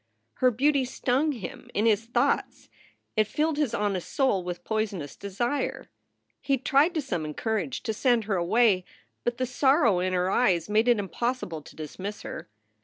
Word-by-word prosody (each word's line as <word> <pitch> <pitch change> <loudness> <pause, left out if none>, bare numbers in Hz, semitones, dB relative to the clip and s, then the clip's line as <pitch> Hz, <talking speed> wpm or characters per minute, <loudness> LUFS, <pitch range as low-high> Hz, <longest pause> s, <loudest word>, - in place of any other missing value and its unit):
Her 255 - +4
beauty 275 +4 +2
stung 260 +4 0
him 220 -11 -8
in 210 - +2
his 225 0 +3
thoughts. 235 - 0 0.5
It 215 -1 +3
filled 305 +5 0
his 295 -6 0
honest 200 -4 -2
soul 260 -9 +2
with 175 0 -5
poisonous 205 -9 -2
desire. 240 +8 -3 0.5
He 275 -1 +1
tried 285 +6 +3
to 310 - 0
summon 160 - -3
courage 210 - -2
to 225 -3 -1
send 240 0 +2
her 205 -1 -1
away, 190 +2 +3 0.4
but 240 0 -1
the 255 - 0
sorrow 265 - +3
in 185 +1 0
her 180 +1 +1
eyes 185 -10 +2
made 215 +3 +2
it 240 -2 +5
impossible 205 -3 -3
to - - -15
dismiss 185 +7 -6
her. - - -7
220 Hz, 170 wpm, -27 LUFS, 185-255 Hz, 0.5 s, it